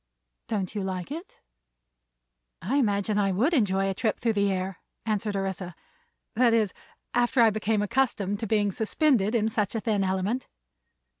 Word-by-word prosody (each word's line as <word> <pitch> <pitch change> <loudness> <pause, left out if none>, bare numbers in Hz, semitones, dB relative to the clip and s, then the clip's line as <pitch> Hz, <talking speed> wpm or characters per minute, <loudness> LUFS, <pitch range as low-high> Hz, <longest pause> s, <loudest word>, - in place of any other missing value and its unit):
"Don't 200 -4 -2
you 210 - -2
like 190 +2 -4
it?" 335 +6 -8 1.2
"I 245 +11 -1
imagine 210 -4 +1
I 195 -1 +2
would 240 - +2
enjoy 195 - +2
a 195 - 0
trip 215 +3 -1
through 230 -2 +1
the 200 -1 +2
air," 185 -1 -3 0.3
answered 210 -1 -1
Orissa; 190 -2 -3 0.6
"that 235 -1 +4
is, 215 -4 +1 0.4
after 245 +2 +2
I 225 -2 +7
became 215 0 0
accustomed 205 -3 0
to 225 - -3
being 205 -1 +2
suspended 225 - +1
in 220 -2 +2
such 215 -1 -1
a - - +1
thin 210 -3 0
element." 190 +6 -1
210 Hz, 160 wpm, -27 LUFS, 195-230 Hz, 1.2 s, I